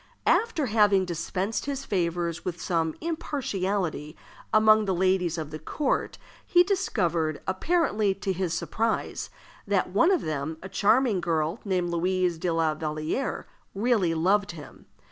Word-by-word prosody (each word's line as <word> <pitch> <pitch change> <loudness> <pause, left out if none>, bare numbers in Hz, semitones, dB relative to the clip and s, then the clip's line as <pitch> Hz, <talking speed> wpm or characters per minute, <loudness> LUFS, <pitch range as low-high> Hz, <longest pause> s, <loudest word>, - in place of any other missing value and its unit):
After 440 -11 +2
having 205 -4 +3
dispensed 185 - -3
his 275 -1 -3
favors 170 -3 -1
with 175 -2 -4
some 165 -3 -1
impartiality 200 - -2 0.3
among 215 0 +5
the 190 -2 0
ladies 180 -2 +1
of 155 -2 -5
the 155 - -6
court, 270 - -2 0.3
he 350 0 +5
discovered, 170 - 0
apparently 210 - +1
to 195 0 -2
his 185 -1 -2
surprise, 225 +6 -2 0.4
that - - +1
one 335 - +4
of 375 -4 +3
them, 155 +1 -3
a 190 - -7
charming 210 +1 +2
girl, 165 +3 -1
named 180 -3 -1
Louise 180 0 0
de 180 +1 -1
la 165 -1 +1
Vallière, 155 - -3 0.3
really 200 -6 +2
loved 195 +4 +2
him. 150 -4 -12
185 Hz, 140 wpm, -27 LUFS, 165-215 Hz, 0.4 s, among